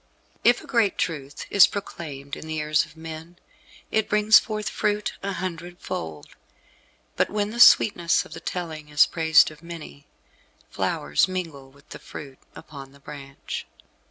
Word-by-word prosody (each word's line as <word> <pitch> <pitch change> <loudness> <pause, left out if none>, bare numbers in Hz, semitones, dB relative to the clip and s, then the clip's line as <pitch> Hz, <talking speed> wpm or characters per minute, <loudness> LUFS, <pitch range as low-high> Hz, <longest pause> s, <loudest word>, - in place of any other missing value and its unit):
If 240 0 +4
a - - -13
great 230 -6 +1
truth 145 -4 -4
is 200 - +8
proclaimed 145 -8 -7
in 160 - -10
the 155 0 -4
ears 150 0 +1
of - - -19
men, 160 +1 -9 0.5
it 220 -1 0
brings 210 +1 +6
forth 215 -1 -5
fruit 210 -1 -1
a 200 0 -3
hundred 175 -1 -5
fold; 80 - -7 0.8
but - - +1
when 205 0 -2
the 235 - -6
sweetness 175 -8 +5
of - - -12
the - - -7
telling 160 -4 -6
is 150 0 +5
praised 160 -1 +4
of 155 0 -15
many, 165 - -10 0.6
flowers 75 0 0
mingle 165 -8 -5
with 140 +2 -23
the - - -9
fruit 135 -3 -10 0.2
upon 135 -2 -11
the 140 - -18
branch. 140 -1 -8
160 Hz, 155 wpm, -24 LUFS, 145-195 Hz, 0.8 s, is